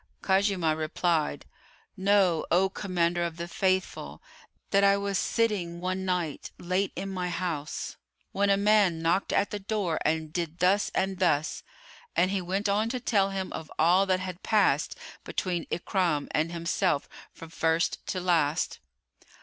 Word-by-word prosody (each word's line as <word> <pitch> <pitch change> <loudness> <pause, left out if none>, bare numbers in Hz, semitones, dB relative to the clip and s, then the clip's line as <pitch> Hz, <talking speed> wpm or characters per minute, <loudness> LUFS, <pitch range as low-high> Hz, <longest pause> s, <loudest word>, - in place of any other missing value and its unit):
Khuzaymah 190 -5 +2
replied, 160 0 0 0.5
"Know, 190 -4 +3
O 190 +2 +3
Commander 175 -3 -1
of 170 -1 -3
the 170 0 -4
Faithful, 185 +2 -1 0.5
that 200 0 +4
I 200 0 +5
was 200 -1 -1
sitting 200 -7 0
one 185 +1 -2
night 175 -5 -2
late 185 +3 -1
in 195 - -4
my 180 -2 -3
house, 165 -4 -4 0.3
when 200 +1 +1
a 195 - +4
man 200 -5 +3
knocked 170 +4 +1
at 200 - +1
the 210 - -3
door 195 -5 -1
and 155 0 -1
did 170 -2 -3
thus 190 +4 +3
and 190 -1 0
thus;" 155 -4 +1 0.5
and 185 - +3
he 195 -1 0
went 190 +4 -1
on 210 +3 +1
to 250 +1 -2
tell 200 -5 +2
him 190 -1 -4
of 160 - -7
all 180 +5 +4
that 185 -1 +2
had 185 -1 -6
passed 215 -2 +2 0.3
between 175 -3 -2
Ikrimah 170 -4 0
and 160 +2 0
himself 170 -2 0 0.2
from 165 -1 -12
first 165 +1 0
to 185 - -2
last. 165 -4 +1
185 Hz, 155 wpm, -28 LUFS, 170-195 Hz, 0.5 s, I